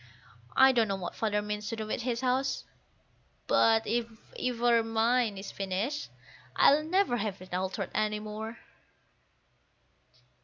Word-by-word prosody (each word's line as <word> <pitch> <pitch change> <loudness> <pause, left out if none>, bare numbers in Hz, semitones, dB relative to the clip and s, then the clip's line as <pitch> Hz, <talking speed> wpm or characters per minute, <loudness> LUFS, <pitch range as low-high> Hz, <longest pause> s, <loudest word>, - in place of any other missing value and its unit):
I 265 0 +7
don't 230 -4 +2
know 195 - -1
what 185 -2 -5
Father 210 -2 -1
means 210 0 -4
to 230 - -3
do 220 -1 -4
with 215 - -3
his 235 0 -2
house, 260 +1 0 0.8
but 225 0 +4
if 235 +1 0 0.3
ever 240 -1 +2
mine 225 -1 +1
is 195 - -7
finished, 200 - -3 0.5
I'll 290 +2 +6
never 355 -5 +1
have 205 -3 -3
it 185 0 -12
altered 185 +1 -2
any 215 0 0
more. 215 +2 -6
225 Hz, 140 wpm, -30 LUFS, 210-245 Hz, 0.8 s, I